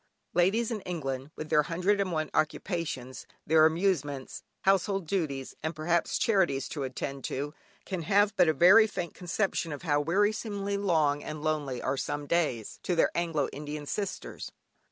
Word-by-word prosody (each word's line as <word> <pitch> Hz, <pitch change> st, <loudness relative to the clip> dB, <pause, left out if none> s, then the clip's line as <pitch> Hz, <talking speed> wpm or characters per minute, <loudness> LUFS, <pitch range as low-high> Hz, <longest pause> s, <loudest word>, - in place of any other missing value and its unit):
Ladies 205 Hz, +7 st, +2 dB
in 215 Hz, -3 st, -3 dB
England, 135 Hz, -7 st, -4 dB
with 155 Hz, -, -7 dB
their 150 Hz, -, +6 dB
hundred 180 Hz, +6 st, +1 dB
and 190 Hz, -2 st, -1 dB
one 155 Hz, -2 st, -2 dB
occupations, 155 Hz, -6 st, -2 dB, 0.2 s
their 155 Hz, 0 st, +6 dB
amusements, 160 Hz, -6 st, -1 dB, 0.2 s
household 195 Hz, -1 st, +2 dB
duties, 155 Hz, -7 st, -2 dB
and 160 Hz, +2 st, -3 dB
perhaps 170 Hz, +2 st, +1 dB
charities 185 Hz, -, +2 dB
to 145 Hz, -, -5 dB
attend 135 Hz, +1 st, -4 dB
to, 145 Hz, +3 st, -3 dB, 0.3 s
can 185 Hz, -3 st, -3 dB
have 205 Hz, +5 st, +3 dB
but 180 Hz, -4 st, +5 dB
a -, -, +3 dB
very 190 Hz, +9 st, +7 dB
faint 175 Hz, -5 st, -4 dB
conception 180 Hz, -2 st, -1 dB
of 145 Hz, +3 st, -6 dB
how 145 Hz, -3 st, +2 dB
wearisomely 200 Hz, +3 st, 0 dB
long 160 Hz, -7 st, +2 dB
and 155 Hz, -1 st, -6 dB
lonely 150 Hz, -5 st, -1 dB
are 135 Hz, +1 st, 0 dB
some 145 Hz, +2 st, -3 dB
days, 145 Hz, -9 st, -1 dB
to 180 Hz, -, -1 dB
their 165 Hz, -, +3 dB
Anglo 165 Hz, -4 st, 0 dB
Indian 150 Hz, +1 st, -6 dB
sisters. 200 Hz, +6 st, -4 dB
165 Hz, 160 wpm, -29 LUFS, 145-190 Hz, 0.3 s, very